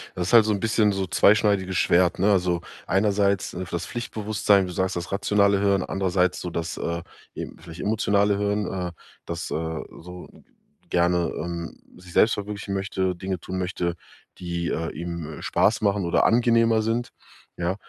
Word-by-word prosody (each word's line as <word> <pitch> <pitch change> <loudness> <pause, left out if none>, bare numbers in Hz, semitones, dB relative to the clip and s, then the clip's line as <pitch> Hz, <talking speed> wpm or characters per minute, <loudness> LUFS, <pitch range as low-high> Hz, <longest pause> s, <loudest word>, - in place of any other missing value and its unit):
das 90 -1 -2
ist - - -2
halt 115 -2 +8
so 110 - +1
ein 100 - +1
'n - - -7
bisschen 110 -1 +2
so 95 -1 -2
zweischneidiges 100 -3 +3
Schwert, 90 0 +3
ne? 100 +2 +4
Also, 90 -3 +1 0.2
einerseits, 100 0 +1
äh, 90 +1 -4
für - - -13
das 85 - -3
Pflichtbewusstsein. 105 -4 +1
Du 90 - -6
sagst: 95 +1 -1
„Das 85 +1 -5
rationale 100 0 +2
Hören“, 100 -2 +2
andererseits 90 -1 0
so 90 - -4
das, 85 0 -4
äh, 85 0 -3 0.3
eben, - - -7
vielleicht 80 0 -11
emotionale 100 -1 +2
Hören, 105 -1 0
äh, 90 -2 -3 0.3
das, 85 0 -5
äh, - - -1 0.5
so 90 +1 -10
g - - -19 0.5
gerne, 85 -1 +2
ähm, 85 0 -5 0.2
sich 90 -1 -14
selbst 110 - +5
verwirklichen 100 -1 -5
möchte, 95 -1 -1
Dinge 95 +1 -4
tun 95 +2 -5
möchte, 90 -1 -2 0.4
die, 85 -1 -3
äh, 80 +1 -2
ihm 85 -2 -6
Spaß 110 +1 +2
machen 100 -2 +1
oder 85 - +2
angenehmer 115 -1 +4
sind. 115 +2 -1 0.5
Ja, 90 +2 -1
95 Hz, 180 wpm, -24 LUFS, 90-105 Hz, 0.5 s, halt